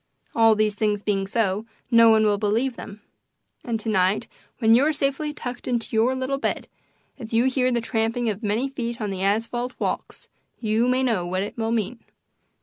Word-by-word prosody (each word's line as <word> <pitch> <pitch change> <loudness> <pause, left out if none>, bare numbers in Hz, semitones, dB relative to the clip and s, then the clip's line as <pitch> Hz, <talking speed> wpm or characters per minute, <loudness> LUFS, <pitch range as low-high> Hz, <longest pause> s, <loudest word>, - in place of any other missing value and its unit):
All 225 -1 +5
these 215 0 +1
things 210 -1 -1
being 195 -2 0
so, 210 0 0 0.2
no 230 -1 +7
one 220 -1 +5
will 205 -1 +2
believe 225 +5 0
them. 205 -2 -10 0.6
And 230 -2 -2
to 225 - -8
night, 195 +2 +1 0.3
when 225 -2 +4
you 245 +4 +5
are 310 - +3
safely 285 +1 -1
tucked 245 -4 -7
into 235 -2 -2
your 235 +4 +3
little 260 +1 -2
bed, - - -2 0.5
if 225 -2 -8
you 230 +2 +3
hear 255 -1 +2
the 240 -1 +1
tramping 230 +1 -1
of 210 -1 -2
many 220 +4 0
feet 235 -3 -4
on 210 -3 -2
the 190 -1 -4
asphalt 230 +5 -1
walks - - -4 0.3
you 220 +1 +1
may 255 +1 +2
know 225 -8 +1
what 185 +2 -1
it 205 - -6
will 225 -1 -2
mean. 230 +1 -1
225 Hz, 195 wpm, -24 LUFS, 210-245 Hz, 0.6 s, no